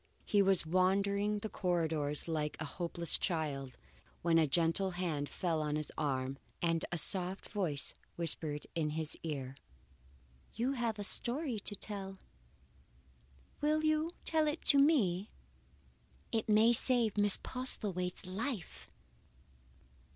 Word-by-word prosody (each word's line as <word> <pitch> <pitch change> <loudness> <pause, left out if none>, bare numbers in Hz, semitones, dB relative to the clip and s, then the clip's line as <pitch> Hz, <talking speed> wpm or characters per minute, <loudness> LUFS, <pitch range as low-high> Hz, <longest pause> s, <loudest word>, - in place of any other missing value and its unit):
He 205 - +3
was 195 -3 +3
wandering 200 +4 +1
the 210 - -4
corridors 160 -7 0
like 155 -2 -2
a 155 - -3
helpless 170 +1 +2
child, 140 -7 -2 0.5
when 165 -1 +4
a 160 - +3
gentle 165 +6 +2
hand 155 -6 -2
fell 165 -3 -1
on 150 -1 -1
his 155 -1 -2
arm 135 -2 -2 0.2
and 165 -1 0
a 175 - -1
soft 185 +3 0
voice 175 -10 -2 0.2
whispered 155 -3 0
in 160 -3 -1
his 160 -1 0
ear: 135 -5 -5 1.0
"You 245 +4 0
have 235 -5 -2
a 205 - -4
story 245 +3 +2
to 205 +1 -4
tell. 195 -1 -6 1.4
Will 305 +1 +1
you 310 +1 +2 0.2
tell 315 -1 +2
it 300 +2 -2
to 280 - +5
me? 215 - +3 1.0
It 225 -1 -1
may 220 +3 +5
save 235 -3 +3
Miss 205 -1 +3
Postlethwaite's 195 -9 -2
life." 200 - -5
185 Hz, 130 wpm, -34 LUFS, 160-215 Hz, 1.4 s, to